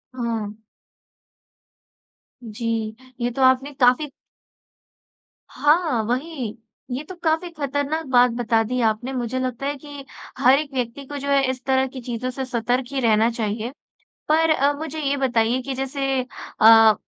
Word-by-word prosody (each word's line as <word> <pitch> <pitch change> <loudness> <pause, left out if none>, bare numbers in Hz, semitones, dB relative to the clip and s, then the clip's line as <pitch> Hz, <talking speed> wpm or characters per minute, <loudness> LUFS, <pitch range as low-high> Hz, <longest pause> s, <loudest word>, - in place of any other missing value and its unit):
हाँ। 220 -3 -3 1.8
जी, 225 -1 -3 0.3
ये 240 +1 0
तो 265 - -4
आपने 260 +2 +3
काफ़ी 255 +3 +3 1.4
हाँ, 300 -5 +2
वही 250 -1 -3 0.3
ये 255 +4 -3
तो 370 - -7
काफ़ी 320 +2 +1
ख़तरनाक 285 +2 -2
बात 245 -1 +5
बता 230 -1 +1
दी 250 +3 -2
आपने 225 +3 0
मुझे 250 0 -2
लगता 255 0 -3
है 285 +1 -1
कि 285 0 -10 0.3
हर 255 - +5
एक 295 -2 -6
व्यक्ति 250 +2 -3
को 290 +2 -6
जो 280 0 -4
है 280 -1 +4
इस 260 -1 -4
तरह 265 -1 +2
की 260 0 -9
चीज़ों 245 +1 -4
से 265 +1 -4
सतर्क 245 +1 -1
ही 275 - -1
रहना 225 -1 +4
चाहिए। 225 +1 -3 0.6
पर 320 +1 +3
अब 285 -1 +2
मुझे 315 0 -5
ये 285 -1 0
बताइए 245 -2 +1
कि 270 +1 -4
जैसे 270 0 -1 0.4
अ, 225 0 +8
255 Hz, 150 wpm, -22 LUFS, 235-280 Hz, 1.8 s, अ